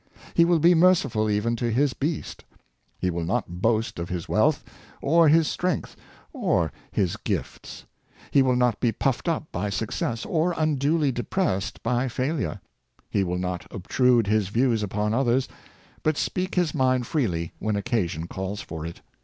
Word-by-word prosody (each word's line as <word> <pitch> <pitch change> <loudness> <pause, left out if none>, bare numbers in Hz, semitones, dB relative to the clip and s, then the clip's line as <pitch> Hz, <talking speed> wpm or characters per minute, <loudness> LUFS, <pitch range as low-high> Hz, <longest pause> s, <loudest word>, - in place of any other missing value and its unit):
He 170 - +5
will 170 0 +4
be 170 +3 +5
merciful 165 -11 +3
even 105 +3 +1
to 120 +1 -1
his 130 +4 +2
beast. 150 +2 -3 0.5
He 90 - -1
will 85 0 -3
not 90 -2 -2
boast 115 -3 +1
of 85 +1 -4
his 90 -2 -4
wealth, 110 - +2 0.4
or 165 +3 +4
his 160 0 +5
strength, 180 -4 -2 0.4
or - - +1 0.2
his 95 -4 0
gifts. - - -5 0.5
He 140 - +5
will 130 -1 +3
not 125 -3 +2
be 120 - +2
puffed 135 +7 -1
up 160 -2 -2
by 95 +4 -2
success, 115 +2 -2
or 170 +2 0
unduly 150 -1 +2
depressed 120 - -2
by 125 +2 +1
failure. 130 - -2 0.5
He 100 - +2
will 90 -1 -2
not 90 -1 -3
obtrude 120 +4 +2
his 105 -1 +1
views 115 +2 +1
upon 105 +1 -1
others, 130 +1 +2 0.5
but 155 -1 +1
speak 185 0 -2
his 175 -4 +1
mind 130 -3 +2
freely 90 - -1
when 110 -1 -1
occasion 100 -7 -1
calls 95 +3 -5
for 80 -5 -6
it. 85 - -9
120 Hz, 160 wpm, -25 LUFS, 100-145 Hz, 0.5 s, He